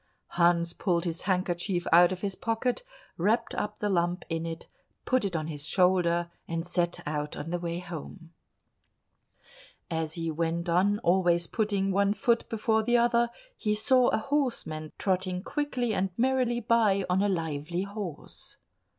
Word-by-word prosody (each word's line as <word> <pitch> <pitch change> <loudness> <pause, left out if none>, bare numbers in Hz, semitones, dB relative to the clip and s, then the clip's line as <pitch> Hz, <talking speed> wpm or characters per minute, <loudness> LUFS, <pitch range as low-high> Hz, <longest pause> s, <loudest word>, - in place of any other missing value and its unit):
Hans 170 -1 +2
pulled 175 -2 0
his 170 0 -3
handkerchief 180 0 0
out 175 +1 +7
of 185 -1 -4
his 200 -2 -2
pocket, 230 +4 -1 0.4
wrapped 220 +7 +1
up 210 0 -3
the 210 - -1
lump 175 -2 0
in 165 0 -2
it, 165 0 -6 0.4
put 255 -2 +2
it 195 -4 -2
on 155 -1 -1
his 150 -2 -6
shoulder, 175 -2 +2 0.2
and 165 0 -3
set 175 0 0
out 150 0 -3
on 165 - -5
the 175 - -1
way 170 0 -3
home. 175 0 -8 1.6
As 160 -1 -2
he 165 -1 -2
went 165 +2 -1
on, 190 +4 +3
always 175 -1 +3
putting 200 -1 0
one 200 +1 +2
foot 235 0 +1
before 220 0 +1
the 240 +2 +3
other, 235 0 +3 0.3
he 210 - 0
saw 255 +3 +4
a - - +2
horseman 220 - -1
trotting 185 -1 -1
quickly 255 -6 -1
and 195 -1 0
merrily 250 -1 +1
by 215 -4 +3
on 180 +1 +2
a 205 - +2
lively 165 0 -2
horse. 200 -5 -7
185 Hz, 160 wpm, -28 LUFS, 170-215 Hz, 1.6 s, out